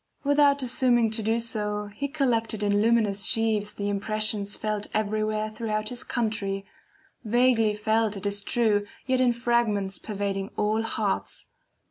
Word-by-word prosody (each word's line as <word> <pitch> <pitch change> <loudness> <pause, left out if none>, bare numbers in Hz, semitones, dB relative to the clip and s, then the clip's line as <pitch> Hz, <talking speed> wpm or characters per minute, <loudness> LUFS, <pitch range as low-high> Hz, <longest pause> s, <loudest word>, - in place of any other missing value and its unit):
Without 285 -1 +4
assuming 240 -2 +3
to 220 0 -1
do 225 +2 +1
so, 210 -3 -2
he 280 +7 -3
collected 230 -7 0
in 205 0 +2
luminous 215 -3 +2
sheaves 215 -1 0
the 200 - -3
impressions 210 0 0
felt 210 -1 -2
everywhere 215 0 -1
throughout 215 -1 -2
his 245 -1 -4
country 205 -4 -2 0.6
vaguely 230 -2 +3
felt 220 0 +1
it 195 - -7
is 205 0 0
true, 210 -1 +1 0.2
yet 260 -1 +1
in 250 -1 +4
fragments 235 -5 0
pervading 200 -2 -3
all 215 +1 +1
hearts. 220 -3 -2
215 Hz, 140 wpm, -26 LUFS, 205-235 Hz, 0.6 s, Without